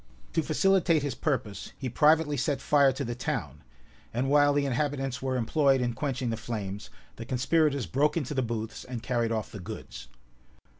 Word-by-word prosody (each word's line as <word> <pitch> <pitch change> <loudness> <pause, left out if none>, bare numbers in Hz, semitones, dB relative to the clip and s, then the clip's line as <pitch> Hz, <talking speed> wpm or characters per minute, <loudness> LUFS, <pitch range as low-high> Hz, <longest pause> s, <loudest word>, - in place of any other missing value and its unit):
To 165 - +2
facilitate 165 0 +2
his 145 -3 -1
purpose, 125 -10 -3
he 130 - -4
privately 150 +4 +3
set 140 +1 0
fire 140 -2 +4
to 135 +1 -4
the 120 - -3
town; 120 - -4 0.5
and 130 +4 -1
while 145 0 +5
the 145 0 +1
inhabitants 135 -1 -1
were 130 -1 -1
employed 135 +3 +3
in 120 -1 0
quenching 130 -3 -2
the 115 - -2
flames, 105 -4 -5 0.3
the 115 - -6
conspirators 135 +2 +1
broke 145 - +1
into 150 -3 -2
the 135 - +1
booths, 115 -2 -4
and 125 -3 -6
carried 120 -2 0
off 110 -2 -2
the 105 - -7
goods. 60 -8 -8
130 Hz, 180 wpm, -28 LUFS, 115-145 Hz, 0.5 s, while